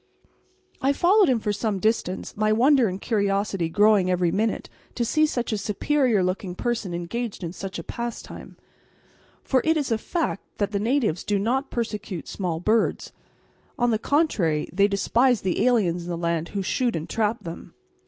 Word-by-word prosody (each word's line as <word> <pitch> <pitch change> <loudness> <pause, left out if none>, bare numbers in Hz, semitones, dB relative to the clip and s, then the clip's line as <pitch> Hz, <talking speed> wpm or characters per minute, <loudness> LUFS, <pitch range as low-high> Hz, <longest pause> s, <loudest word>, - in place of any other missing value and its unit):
I 275 +2 +3
followed 380 +4 +4
him 250 -3 +2
for 210 -1 -1
some 210 -1 -1
distance, 190 -2 -1
my 215 +1 +1
wonder 255 +2 +4
and 185 0 -4
curiosity 200 -5 0
growing 205 0 +4
every 180 -2 +2
minute 220 +1 -1 0.3
to 240 - 0
see 310 +6 +3
such 245 -5 -2
a 210 - -1
superior 225 +1 +1
looking 185 0 -2
person 230 -4 -2
engaged 200 +5 -4
in 170 0 -4
such 190 -1 -6
a - - -6
pastime. 235 0 -7 0.9
For 260 -2 +2
it 320 0 +2
is 280 -5 -2
a 225 - +1
fact 325 - -2
that 205 -1 -1
the 200 - -1
natives 225 - 0
do 205 - 0
not 250 +7 0
persecute 210 -6 -4
small 175 -5 -3
birds. 215 +5 0 0.6
On 240 0 +2
the 220 - +1
contrary, 210 - +1
they 200 +2 +4
despise 230 +4 +2
the 185 -2 0
aliens 180 -8 +1
in - - -7
the 170 - -2
land 170 -1 -1
who 195 - -1
shoot 245 +4 0
and 160 0 -4
trap 220 +1 -1
them. 165 0 -9
210 Hz, 175 wpm, -24 LUFS, 185-240 Hz, 0.9 s, followed